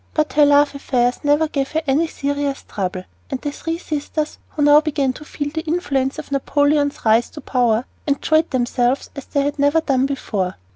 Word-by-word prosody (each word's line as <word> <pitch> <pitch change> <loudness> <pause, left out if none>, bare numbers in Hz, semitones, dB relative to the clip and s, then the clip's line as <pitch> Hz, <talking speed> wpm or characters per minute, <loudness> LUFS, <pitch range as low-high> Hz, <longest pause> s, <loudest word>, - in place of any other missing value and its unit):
But 305 -1 +1
her 295 0 +5
love 285 0 +4
affairs 245 -3 0
never 295 +2 +3
gave 275 -2 -3
her 320 +1 0
any 290 +4 +2
serious 285 -2 -2
trouble; 185 -2 -3 0.3
and 265 - -3
the 290 - -3
three 325 +3 -4
sisters, 305 -1 -4
who 295 - -2
now 295 +1 +7
began 285 -4 0
to 300 - -11
feel 290 -1 -5
the 320 - -2
influence 290 -5 -1
of - - -8
Napoleon's 285 +1 +1
rise 225 +2 +4
to - - -10
power, 245 -2 +1 0.2
enjoyed 315 +3 +2
themselves 245 0 0
as 280 - -7
they 280 -2 0
had 285 +1 -2
never 285 +3 +4
done 270 -4 +1
before. 205 -9 -2
285 Hz, 190 wpm, -20 LUFS, 260-300 Hz, 0.3 s, now